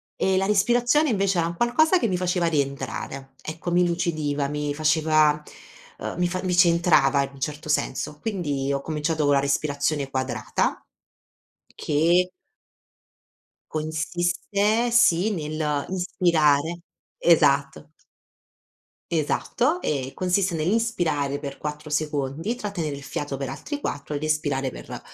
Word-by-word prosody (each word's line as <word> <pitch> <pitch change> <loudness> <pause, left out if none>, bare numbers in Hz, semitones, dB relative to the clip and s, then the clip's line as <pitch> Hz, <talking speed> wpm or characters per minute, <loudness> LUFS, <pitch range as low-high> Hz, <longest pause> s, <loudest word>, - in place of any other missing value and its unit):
Ehm, 190 0 +1
la 195 - +2
respirazione 240 +8 +3
invece 195 -4 +1
era 165 - +1
un 170 - -5
qualcosa 315 +9 +3
che 235 - +1
mi 180 -2 0
faceva 180 -1 0
rientrare. 135 -2 -3
Ecco, 160 +2 -5
mi 180 +1 +4
lucidiva, 155 -5 -1
mi 150 0 -3
faceva, 155 -1 +3 0.6
uhm, - - -5
mi 175 - +2
fa 185 +1 -4
mi 180 -1 0
centrava 170 -6 +4
in 135 - -5
un 135 - -14
certo 150 +2 -4
senso. 150 0 -1
Quindi 145 -10 -2
ho 140 0 -1
cominciato 155 0 -1
con 145 - +4
la 140 - +4
respirazione 140 0 0
quadrata 130 -5 -1 1.0
che 170 +5 +2 1.4
consiste 175 +8 0
sì 220 -4 +4
nell'inspirare 155 0 0 0.4
esatto. 145 -4 +3 1.2
Esatto, 245 - 0
ehm, 135 -3 -2
consiste 185 -1 0
nell'inspirare 160 -7 0
per 140 -1 -7
4 150 0 -6
secondi, 150 - -2
trattenere 175 - -4
il 140 - -10
fiato 145 0 -4
per 135 -1 -4
altri 150 - -5
4 145 - -4
ed 150 - -4
espirare 145 -4 0
per - - -8
155 Hz, 125 wpm, -24 LUFS, 145-180 Hz, 1.4 s, mi